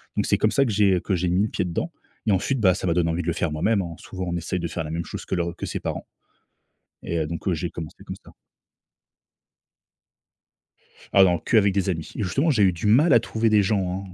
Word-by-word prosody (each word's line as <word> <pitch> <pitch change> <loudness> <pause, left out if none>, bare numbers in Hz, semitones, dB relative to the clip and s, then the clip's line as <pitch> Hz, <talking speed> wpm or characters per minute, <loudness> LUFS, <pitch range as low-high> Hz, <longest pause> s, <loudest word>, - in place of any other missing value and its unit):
Donc, - - 0
c'est - - +2
comme - - +2
ça 140 - +3
que 125 - -1
j'ai 100 -3 +3
que 100 - -2
j'ai 90 +1 -1
mis 90 +3 +2
le 110 - -1
pied - - -2
dedans 90 - -3 0.3
et 110 - +2
ensuite, 115 +7 0
bah, 95 -3 +5
ça 90 - -4
m'a 85 - +2
donné 85 -1 +1
envie 85 +2 -1
de 85 - -7
le 85 - +1
faire 85 -1 -1
moi-même, 100 +7 +1
hein. 85 -2 -6
Souvent, 95 -1 -7
on 85 0 -2
essaye 85 +2 -3
de 85 - -2
faire 80 0 -4
la 75 - -6
même 85 +1 -2
chose - - -7
que - - -2
leurs 85 -1 -2
que - - -4
ses - - -4
parents. - - -4 1.0
Et 85 - -2
heu, 80 - -1
donc, 85 +4 -3
j'ai 85 +1 -3
commencé 80 -2 -9
comme - - -7
ça. - - -17 2.8
Ah 100 - +7
non, 90 -2 +3
qu'avec 100 -1 +3
des 100 0 0
amis. 80 -3 -3
Justement, 135 - +1
j'ai 120 -7 +2
eu 95 - +5
du 85 +5 -6
mal 135 +9 +5
à 120 - +7
trouver 115 0 0
des 105 -2 +4
gens, 95 -1 -1
95 Hz, 245 wpm, -24 LUFS, 85-105 Hz, 2.8 s, Ah